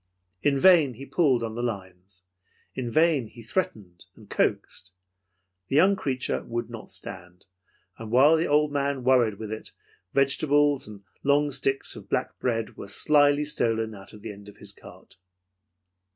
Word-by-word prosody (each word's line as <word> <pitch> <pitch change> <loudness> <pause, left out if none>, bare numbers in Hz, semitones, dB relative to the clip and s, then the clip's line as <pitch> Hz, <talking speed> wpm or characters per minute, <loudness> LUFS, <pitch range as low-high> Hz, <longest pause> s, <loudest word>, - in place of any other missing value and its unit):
In 140 -2 +2
vain 160 -7 +5
he 135 +5 -9
pulled 135 -7 +2
on 110 -1 -4
the 120 - -4
lines. 95 -4 -6 0.5
In 125 -2 -4
vain 155 -2 +2
he 115 +2 -13
threatened 105 - -4
and - - -17
coaxed. 95 0 -1 0.7
The - - -2
young 190 +6 +5
creature 130 -7 -2
would 120 0 -4
not 115 -2 -9
stand, 90 +1 -10 0.5
and 110 -1 -7
while 135 +7 +6
the 160 +1 0
old 150 0 +2
man 140 -2 -1
worried 120 -5 +3
with 110 0 -6
it, 110 - -9 0.4
vegetables 145 0 +2
and 105 -2 -11 0.2
long 145 +1 +2
sticks 135 +1 -1
of - - -12
black - - -2
bread 115 -3 -2
were - - -8
slyly 145 +4 +3
stolen 115 -6 0
out 95 -2 -12
of 105 - -14
the 110 - -5
end 100 0 -12
of 105 - -16
his 105 - -8
cart. 95 - -16
125 Hz, 165 wpm, -26 LUFS, 110-145 Hz, 0.7 s, while